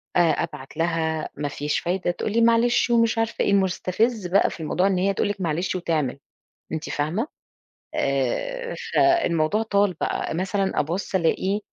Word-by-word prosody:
آآ، 175 - +5
أبعت 150 -4 -1
لها 165 -1 0
مفيش 145 0 -2
فايدة، 180 0 -1
تقُول 205 - -3
لي: 230 - +2
"معلش" 235 +1 +4
ومش 230 -1 +3
عارفة 225 0 0
إيه، - - +1
المستفِز 195 +2 +1
بقى 190 +3 +3
في - - -9
الموضوع 180 +4 +1
إن 195 -2 +1
هي 195 +2 +2
تقُول 200 - 0
لِك 205 -1 -4
معلش 175 +2 -1
وتعمل، 155 -7 -1 0.5
أنتِ 155 -1 -4
فاهمة، 160 - -1 0.7
آآ 475 - -1 0.2
فالموضوع 210 - +3
طال 200 -3 +2
بقى، - - -1
مثلًا 190 +2 0
أبُص 170 +6 -2
ألاقي 190 +3 +1
185 Hz, 155 wpm, -24 LUFS, 160-215 Hz, 0.7 s, آآ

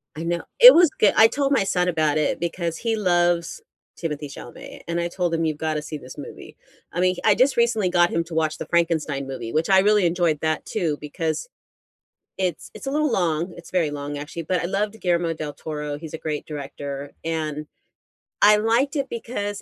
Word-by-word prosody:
I 160 - -5
know, 170 0 -1 0.2
it - - +12
was 345 -2 +6
goo 210 - +5
I 220 - +8
told 280 +3 -1
my 270 - +3
son 180 -2 0
about 155 -3 +1
it 155 - 0
because 170 -1 -3
he 230 -1 -1
loves 175 - +1 0.4
Timothée 150 -3 -4
Chalamet, 275 +1 -11
and 170 0 -1
I 170 - 0
told 175 -1 -2
him 165 0 0
"You've 155 -2 -1
gotta 155 -1 -2
see 150 0 -6
this 130 0 -12
movie," 145 - -10 0.4
I 175 - -3
mean, 185 0 +2
I 210 -2 +5
just 260 0 +3
recently 225 -5 +2
got 175 -1 +3
him 170 - 0
to 165 - -10
watch 155 -1 0
the - - -6
Frankenstein 160 -5 0
movie, 130 -4 -6
which 160 +4 0
I 190 -1 +6
really 210 -1 +4
enjoyed 170 -3 +1
that 155 -1 -1
too 165 -8 -1
because 160 - -3 0.9
it's 180 -4 -2
it's - - -10
a 270 - -1
little 300 -1 +1
long, 175 -3 0
it's 170 - -12
very 170 -5 +1
long, 145 0 -5
actually, 150 +3 -6
but 180 +2 -1
I - - -1
loved 205 +4 -2
Guillermo 170 -2 0
del 155 -2 -5
Toro, 150 -1 -5
he's 160 -1 -9
a 160 - -4
great 150 -2 -4
director, 140 -1 -6
and 155 -2 -3 0.8
I 210 +1 +8
liked 235 +7 +1
it 275 -2 -1
because, 205 -3 -4
170 Hz, 210 wpm, -23 LUFS, 155-205 Hz, 0.9 s, it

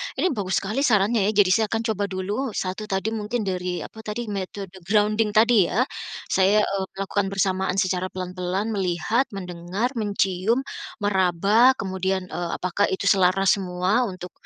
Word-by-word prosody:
Ini 370 - +1
bagus 200 -6 -1
sekali 215 +7 -2
sarannya 215 -4 +3
ya 215 - +2
jadi 185 - 0
saya 220 +3 +4
akan 225 +2 -1
coba 205 -1 -1
dulu 205 +6 -3
1 190 +3 -3
tadi 195 +2 -1
mungkin 220 +1 -2
dari 180 -2 -3
apa 220 - -11
tadi? 220 0 -5
Metode 195 -1 -5 0.2
grounding 210 +1 +2
tadi 220 -5 +5
ya? 240 +5 +2 0.5
Saya, 200 +3 +4
eee, 195 -2 -1
melakukan 195 0 -1
bersamaan 190 -1 0
secara 185 -1 0
pelan-pelan, 185 +3 -3
melihat, 195 +6 0
mendengar, 180 +5 -3
mencium, 205 +3 0 0.4
meraba, 200 +6 +4
kemudian, 190 -2 -2
eee, 175 -1 -3
apakah 185 +3 0
itu 195 +1 +1
selaras 195 +1 +3
semua, 185 +6 0
untuk, 185 -1 -8
195 Hz, 155 wpm, -24 LUFS, 185-215 Hz, 0.5 s, tadi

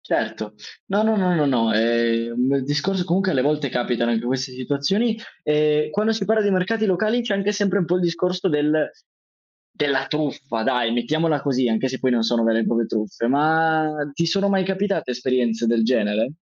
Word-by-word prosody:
Certo, 105 0 -3 0.3
no, 200 +2 +1
no, 220 0 +2
no, 185 -3 +2
no, 150 -3 +2
no, 115 -5 +2
ehm, 115 +3 +1
il 135 - 0
discorso 150 +7 -1
comunque 190 +2 0
alle 130 - +1
volte 145 -1 0
capitano 120 -1 -1
anche 115 0 -1
queste 130 +1 -2
situazioni. 145 - -1 0.3
Ehm, 150 0 +1
quando 210 +5 +1
si 220 -3 -2
parla 220 +1 +2
di 205 - +1
mercati 205 +4 0
locali 215 +6 +1
c'è 230 -4 -1
anche 195 +1 0
sempre 205 -2 0
un 185 - +1
po' 175 +2 +1
il 180 - 0
discorso 180 +2 0
del 150 0 +1 0.8
della 140 -2 0
truffa 140 -6 -3
dai, 125 -2 +1
mettiamola 150 +6 0
così, 130 -3 0
anche 110 +4 0
se 130 0 -5
poi 130 - +1
non 120 -2 +1
sono 115 0 +1
vere 115 0 +2
e - - -1
proprie 115 -1 0
truffe; 110 +1 -3
ma 155 +3 +2 0.2
ti 170 +4 -1
sono 195 +4 +1
mai 190 -1 +1
capitate 195 -6 -1
esperienze 120 -2 -1
del 115 0 +2
genere? 110 +1 0
145 Hz, 195 wpm, -22 LUFS, 120-185 Hz, 0.8 s, no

